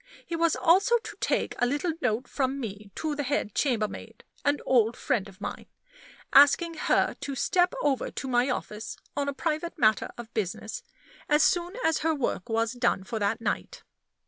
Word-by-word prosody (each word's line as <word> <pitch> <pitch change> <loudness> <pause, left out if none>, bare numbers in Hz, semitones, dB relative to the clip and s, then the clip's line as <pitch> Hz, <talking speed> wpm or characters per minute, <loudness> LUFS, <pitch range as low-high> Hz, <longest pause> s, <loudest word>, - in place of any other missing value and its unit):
He 335 - -4
was 330 -1 +2
also 380 +7 +4
to 465 - -9
take - - 0
a 245 - +3
little 290 +6 0
note 245 0 0
from 270 0 -1
me 205 -4 -6
to 310 -1 -2
the 290 - -2
head 275 -7 -1
chambermaid 230 -7 -2 0.2
an 285 0 +2
old 235 -2 +3
friend 215 -8 -1
of 195 +1 -17
mine - - -6 0.7
asking 290 +4 +6
her 315 - +1
to 285 -1 -4
step 355 - +2
over 275 -3 +1
to 270 - -6
my 250 +1 +2
office, 220 -3 -4 0.2
on 280 0 0
a - - -3
private 325 +2 -2
matter 215 -2 +3
of 235 -1 -9
business, 215 - -3 0.5
as 300 0 +5
soon 350 +1 +1
as 320 -1 +2
her 320 0 +1
work 240 -8 -2
was 225 0 +1
done 245 -5 +1
for 220 +3 -4
that 210 +3 0
night. - - -3
270 Hz, 180 wpm, -27 LUFS, 225-315 Hz, 0.7 s, asking